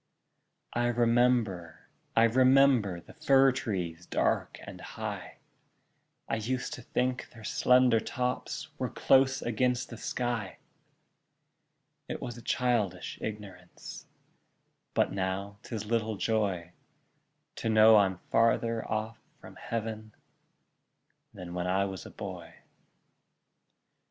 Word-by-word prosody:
I 120 0 +1
remember, 120 -7 +1 0.3
I 115 - +6
remember, 125 -5 +4
The - - -15
fir 135 -4 +4
trees 90 -8 -4
dark - - 0
and - - -10
high; - - -6 0.9
I 115 - -1
used 125 +4 -3
to - - -7
think 125 +2 -2
their 115 -2 -14
slender 125 +1 +4
tops 125 +2 -3
Were - - -1
close 135 0 +3
against 125 +1 0
the 115 - -7
sky: 120 -3 -3 1.5
It - - -4
was 120 - -6
a 120 - -10
childish 120 -7 -1
ignorance, 100 -4 -8 0.9
But - - +2
now 100 +1 -3
'tis 110 -3 -6
little 110 -1 -1
joy 95 -6 -1 0.9
To 115 - -2
know 110 0 +7
I'm 95 -3 +3
farther 115 0 +2
off 110 +1 -3 0.2
from - - -13
Heav'n 110 -1 -5 1.2
Than 90 -1 -9
when 90 0 -2
I 95 +2 +2
was 95 -2 -6
a - - -10
boy. - - -8
115 Hz, 110 wpm, -30 LUFS, 100-125 Hz, 1.5 s, know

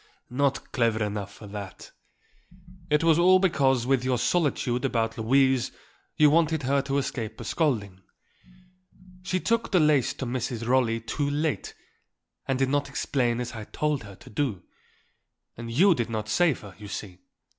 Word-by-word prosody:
"Not 140 +1 0
clever 115 -3 +1
enough 100 -1 -4
for 105 - -13
that. 100 -2 -8 1.0
It 150 +1 +2
was 165 -1 +4
all 185 +2 +6
because 135 -10 +2
with 130 -1 +2
your 130 -1 +1
solicitude 130 -4 0
about 115 -4 0
Louise 130 +2 +2 0.5
you 150 -1 +6
wanted 160 -1 +2
her 140 +2 +2
to 140 0 -2
escape 115 -5 -3
a - - -6
scolding. 110 - -1 1.2
She 185 0 -1
took 230 +4 0
the 185 - +4
lace 150 -5 +3
to 135 - -5
Mrs. 120 -1 -3
Rolley 120 -3 +2
too 140 +5 -2
late 150 +1 -2 0.7
and 135 - 0
did 135 0 +1
not 145 0 0
explain 125 -3 0
as 125 -1 -4
I 110 -3 -7
told 150 +2 -1
her 100 -2 -11
to - - -15
do. 110 -6 -2 0.9
And 115 0 -7
you 180 +10 +5
did 120 -6 -2
not 110 -1 -3
save 165 +2 +2
her, 100 -3 -11
you 105 - -9
see. 95 -2 -7
130 Hz, 165 wpm, -26 LUFS, 115-150 Hz, 1.2 s, all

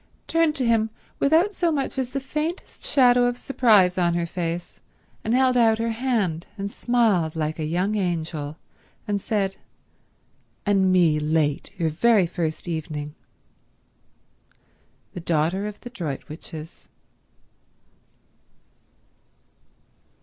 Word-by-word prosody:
turned 330 -2 +2
to 260 - 0
him 225 -1 +2 0.3
without 330 +8 +3
so 345 -3 +1
much 275 -2 -2
as 255 -2 -1
the 275 +2 -3
faintest 310 +6 -4
shadow 245 -2 +4
of 245 0 -2
surprise 210 -9 +3
on 170 -1 +2
her 170 0 0
face, 170 0 -4 0.4
and 225 - +1
held 260 -1 +3
out 225 -2 +4
her 230 0 -1
hand, 220 -9 -1
and 200 0 -4
smiled 215 -12 +1
like 155 0 -2
a 155 - -1
young 180 +6 0
angel, 165 -6 -2 0.5
and 205 -1 -1
said, 195 -3 -1 1.1
"and 195 -2 +3
me 170 -4 +4
late 150 0 0
your 165 -3 0
very 210 +4 +4
first 165 -1 -3
evening." 155 -3 -4 2.0
The 180 - -6
daughter 170 +4 0
of 210 - -8
the 245 - -8
Droitwiches. 155 - -7
195 Hz, 120 wpm, -24 LUFS, 165-245 Hz, 2.0 s, shadow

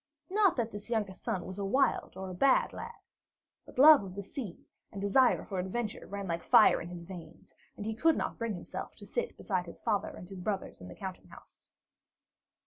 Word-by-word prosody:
Not 400 -3 +4
that 235 -3 -1
this 205 +2 -9
youngest 210 -5 -2
son 180 -3 -2
was 185 +2 -7
a - - -2
wild 260 +8 +1
or 190 -1 -5
a - - -6
bad 260 +9 +3
lad; - - -7 0.7
but - - -14
love 300 +2 +9
of 185 -1 -8
the 200 - -5
sea 210 - -7 0.3
and 200 - -7
desire 200 +6 +3
for 190 -3 -3
adventure 210 +4 -3
ran 200 0 -5
like 170 0 -2
fire - - +6
in 170 - -7
his 175 -1 -8
veins, 175 -1 -11 0.2
and 210 - -6
he 220 - -1
could 320 +8 +3
not - - -3
bring 230 -3 -2
himself 175 - -7
to - - -12
sit 485 - -3
beside 185 -3 -2
his 170 - -10
father 205 - 0
and 180 - -10
his 190 -1 -8
brothers 195 - -3
in 90 - -9
the 90 - -10
counting 190 -1 -7
house. - - -17
200 Hz, 215 wpm, -31 LUFS, 185-235 Hz, 0.7 s, love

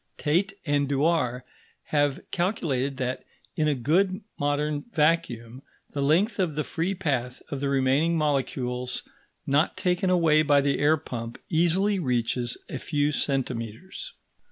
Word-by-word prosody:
Tait 180 +6 +1
and 145 -2 +1
Dewar 140 -4 +1 0.5
have 145 -2 +2
calculated 140 - -1
that, 130 -1 -2 0.3
in 155 - +1
a 150 - +2
good 185 - +1 0.2
modern 145 +1 0
vacuum, 135 - 0 0.3
the 140 - -3
length 170 +11 +2
of 175 -6 0
the 150 - 0
free 175 +6 -2
path 130 -9 -2
of 140 - -2
the 140 0 -1
remaining 140 +5 +2
molecules 130 -4 -1 0.4
not 145 +4 +2
taken 180 0 +1
away 165 -4 +4
by 145 -2 +4
the 140 0 +1
air 150 +2 +4
pump 115 -4 -6
easily 185 +5 +2
reaches 120 -4 0
a - - -5
few 145 -1 0
centimetres. 135 - -3
145 Hz, 135 wpm, -26 LUFS, 130-170 Hz, 0.5 s, away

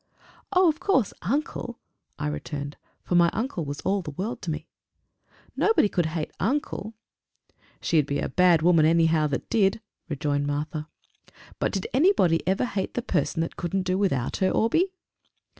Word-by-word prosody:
"Oh! 370 -2 +5
of 315 -1 +1
course! 275 - +2
uncle!" 240 - -2 0.4
I 150 - -3
returned; 145 -1 -4 0.3
for - - -3
my 170 -1 +6
uncle 220 - -2
was 145 0 -5
all 195 +1 0
the 160 - -7
world 190 - -4
to 175 - -5
me. 155 0 -3 0.9
"Nobody 440 - +3
could 175 -5 0
hate 160 -1 -3
uncle!" 225 -2 -2 0.9
"She'd 155 -4 +2
be 140 - -1
a - - -1
bad 175 -3 +4
woman, 165 -3 +5
anyhow, 165 -1 +3
that 140 -2 -3
did!" 200 -2 +3 0.3
rejoined 145 -1 -1
Martha. 150 +1 -3 0.7
"But - - 0
did 195 -3 -3
anybody 260 - +4
ever 195 +6 +2
hate 200 -5 -3
the 245 - -1
person 165 - 0
that 165 - -4
couldn't 185 +2 -1
do 185 0 0
without 180 -11 0
her, 190 - +2
Orbie?" 330 - +2
180 Hz, 160 wpm, -26 LUFS, 155-225 Hz, 0.9 s, my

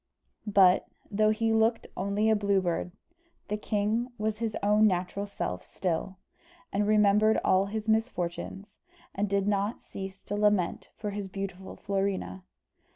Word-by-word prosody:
But, 195 -3 +5 0.2
though 215 +1 +3
he 225 +1 +1
looked 225 +1 +2
only 200 +3 0
a 220 - +5
blue 200 -1 +2
bird, 180 -1 -2 0.6
the 210 - 0
king 215 +3 -1
was 215 0 -2
his 225 -2 -2
own 210 +1 +5
natural 185 +2 -1
self 90 - -4
still, 185 +1 -3 0.6
and 205 +1 +1
remembered 210 0 +4
all 190 +1 +3
his 215 +1 -4
misfortunes, 205 -3 -1 0.4
and 200 +1 -1
did 200 0 +1
not 205 +2 -1
cease 190 0 -6
to 205 - -4
lament 205 -4 +1
for 210 -1 -4
his 200 -1 -4
beautiful 190 -1 -6
Florina. 195 - -2
205 Hz, 145 wpm, -29 LUFS, 190-215 Hz, 0.6 s, But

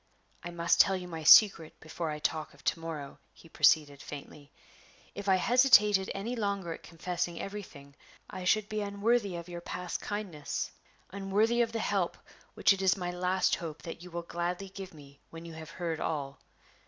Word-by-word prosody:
"I 175 - -5
must 170 0 +1
tell 195 - +6
you 180 -1 -7
my 165 -2 -6
secret 165 -1 +7
before 160 +1 -5
I 150 - -3
talk 155 0 -3
of - - -20
to - - 0
morrow," 155 -4 -7
he - - -17
proceeded, 145 -3 +3
faintly. 145 0 -10 0.6
"If 200 0 -4
I 190 - +6
hesitated 210 -3 +5
any 220 +6 -3
longer 200 -6 -2
at - - -11
confessing 175 0 -4
everything, 160 -9 -8 0.3
I 185 - -7
should 210 +3 +2
be 215 0 -3
unworthy 205 0 0
of 170 0 -7
your 175 -1 -7
past 180 0 -5
kindness, 200 -8 -4 0.4
unworthy 205 +5 +1
of 230 -1 +1
the 230 - -3
help 195 -5 -1 0.4
which - - +5
it 195 - -5
is 190 0 +3
my 175 -1 -3
last 180 +1 +1
hope 165 -3 -7
that 165 0 -7
you 180 - -10
will 170 0 -5
gladly 175 +3 -3
give 190 0 -8
me 140 -3 -15
when 165 0 -10
you 165 - -9
have 160 0 -9
heard 165 -2 -4
all." 140 -3 -3
180 Hz, 185 wpm, -30 LUFS, 165-200 Hz, 0.6 s, secret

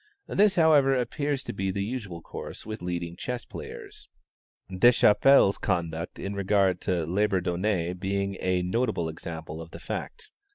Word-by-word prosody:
This, 205 0 +3
however, 150 -5 +5
appears 140 +3 -1
to - - -5
be 95 -1 -2
the 100 +1 -1
usual 100 -7 -5
course - - -8
with 110 -2 -6
leading 85 -1 -4
chess 125 +5 -4
players, - - -9 0.6
Deschappelle's 105 +2 +5
conduct 85 -3 -2
in 100 - -4
regard 100 -2 +2
to 85 -3 0
Labourdonnais 90 -1 0
being 100 +1 -2
a 90 -1 0
notable 105 -2 0
example 80 0 -7
of 80 - -9
the - - -10
fact. 440 -3 -6
95 Hz, 140 wpm, -27 LUFS, 90-120 Hz, 0.6 s, however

